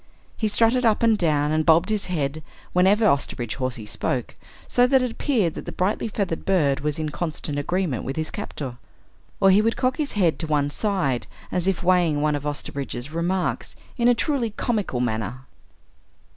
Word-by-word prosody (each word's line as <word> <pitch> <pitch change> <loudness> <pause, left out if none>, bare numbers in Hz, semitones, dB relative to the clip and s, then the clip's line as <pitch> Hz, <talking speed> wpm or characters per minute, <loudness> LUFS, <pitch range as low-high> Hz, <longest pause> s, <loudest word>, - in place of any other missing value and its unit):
He 220 - 0
strutted 230 +4 +3
up 225 -1 +3
and 225 -1 +5
down, 150 -6 +1
and 155 0 +2
bobbed 165 +4 +4
his 215 -2 -1
head 155 -3 -2 0.3
whenever 195 +5 +4
Osterbridge 135 - 0
Hawsey 130 -5 -3
spoke, 120 +3 -3 0.3
so 245 0 +4
that 265 0 +4
it 250 - -1
appeared 225 - 0
that - - -7
the - - -5
brightly 195 +5 -1
feathered 200 -6 -2
bird 150 -8 +2
was 150 +1 -2
in 155 -1 -2
constant 150 -2 -3
agreement 170 - -1
with 135 - -4
his 155 0 -3
captor. 140 -11 -6 0.6
Or 195 -1 +6
he 200 +3 +6
would 225 +1 0
cock 255 0 +1
his 300 -3 -2
head 180 -6 +2
to 160 - -3
one 145 -2 +1
side 150 - -1 0.2
as 180 0 0
if 195 -1 0
weighing 175 -4 +3
one 150 0 +1
of 145 0 -4
Osterbridge's 140 -2 -5
remarks, 175 +3 -1 0.2
in 240 -1 +2
a 245 - +5
truly 250 -2 0
comical 210 - -1
manner. 120 +2 -3
170 Hz, 185 wpm, -24 LUFS, 145-210 Hz, 0.6 s, Or